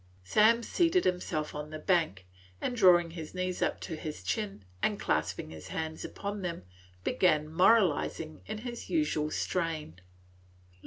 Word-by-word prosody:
Sam 220 - +4
seated 345 +6 +2
himself 170 -4 -1
on 150 0 -5
the 155 - -6
bank, 155 - +1 0.3
and, 250 - -2
drawing 175 -6 +6
his 165 0 -8
knees 185 0 -2
up - - +1
to 165 - -4
his 155 - -6
chin 195 - -3 0.2
and - - +1
clasping - - -1
his 80 -1 -9
hands 160 0 -4
upon 205 0 -5
them, 170 - -4 0.4
began 155 -5 +2
moralizing 175 -4 +3
in 215 - -4
his 240 +1 -7
usual 300 - +1
strain. 155 - -2
175 Hz, 145 wpm, -30 LUFS, 155-210 Hz, 0.4 s, drawing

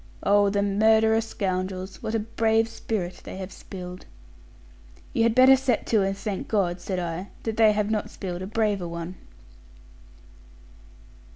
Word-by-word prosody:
Oh, 205 0 +4
the 200 0 +1
murderous 220 +2 +3
scoundrels, 185 -1 -3
what 220 - -3
a - - +2
brave 225 +1 +1
spirit 215 -5 -4
they - - -8
have 190 0 -6
spilled!' 180 -1 -9 1.1
'You 245 - +1
had 230 0 +3
better 260 +1 +8
set 260 -3 0
to 215 - +5
and 195 0 -1
thank 200 -1 -4
God,' 180 -4 0
said 190 - -3
I, 175 +2 -3 0.2
'that 225 -1 -3
they 220 -1 +6
have 210 0 0
not 215 -2 -1
spilled 180 -2 -6
a 185 - -4
braver 205 -4 0
one.' 170 +1 -5
205 Hz, 155 wpm, -25 LUFS, 185-220 Hz, 1.1 s, better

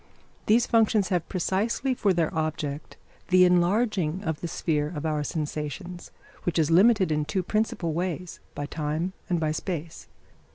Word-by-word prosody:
These 230 +3 +4
functions 220 -4 +3
have 175 -3 -1
precisely 205 +8 0
for 210 -5 +1
their 170 -3 0
object 155 -2 -3 0.3
the 180 0 +6
enlarging 180 -1 +2
of 160 -5 -3
the 170 - -3
sphere 150 -2 -1
of 150 - -4
our 150 -2 0
sensations, 155 +3 -5 0.3
which 175 - -2
is 160 -1 +2
limited 190 0 +5
in 150 0 +1
two 170 +5 -2
principal 190 -4 -1
ways, 180 +1 -3 0.2
by 145 - -3
time 155 +4 -2 0.2
and 175 -2 +1
by 155 -1 0
space. 165 0 -5
175 Hz, 155 wpm, -26 LUFS, 155-190 Hz, 0.3 s, the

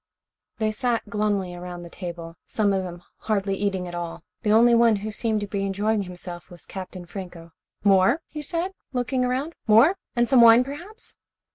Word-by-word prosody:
They 220 -1 0
sat 235 0 -1
glumly 205 -3 0
around 175 0 -7
the 170 - -9
table, 170 -3 -7
some 205 -2 +1
of 190 - +1
them 175 -1 -7
hardly 200 -2 -1
eating 195 -2 -1
at 175 - -8
all. 170 -1 -5 0.2
The 210 - +1
only 235 +2 +6
one 230 -1 +5
who 210 +2 -4
seemed 220 0 -1
to 205 - -3
be 200 -1 -2
enjoying 205 +2 0
himself 180 -1 -8
was 175 -2 -13
Captain 185 -1 -8
Franco. 175 -2 -9 0.3
"More?" 205 - +4
he 300 - -7
said, 340 +5 -1 0.2
looking 255 +1 0
around. 260 +6 -1
"More? 240 - +6 0.2
And 240 0 +3
some 260 -2 +6
wine, 230 +1 +8
perhaps." 345 - -7
210 Hz, 180 wpm, -24 LUFS, 180-240 Hz, 0.3 s, wine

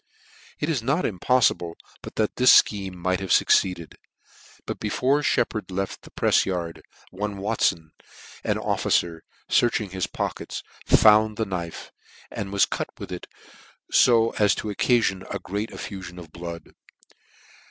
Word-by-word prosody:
It 145 - -1
is 155 -7 0
not 140 +9 0
impoffible 95 -4 +1 0.3
but - - -10
that 110 -1 -1
this 125 0 +8
fcheme 95 -3 -6
might 90 +1 -1
have 95 -1 -6
fucceeded; 85 -2 +2 0.7
but - - -5
before 140 +3 +1
Sheppard 110 -7 0
left 95 +1 -4
the - - -14
prefs - - +2
yard, 85 -3 -4 0.3
one 105 +2 -4
Watfon, 95 -6 0 0.5
an - - 0
officer, 85 -1 0 0.3
fearching 110 -5 +1
his 95 -1 -2
pockets, - - -4 0.2
found 110 0 +5
the 110 - 0
knife 85 -4 -6 0.4
and 100 -1 -5
was 100 0 +4
cut - - -3
with - - -8
it, - - -6 0.7
fo 115 -2 +5
as 105 -3 +4
to 110 - -4
occafion 100 -3 +1
a - - -2
great 105 +3 -4
effufion 95 -3 -8
of 85 -3 -11
blood. 85 0 -8
100 Hz, 140 wpm, -24 LUFS, 90-110 Hz, 0.7 s, this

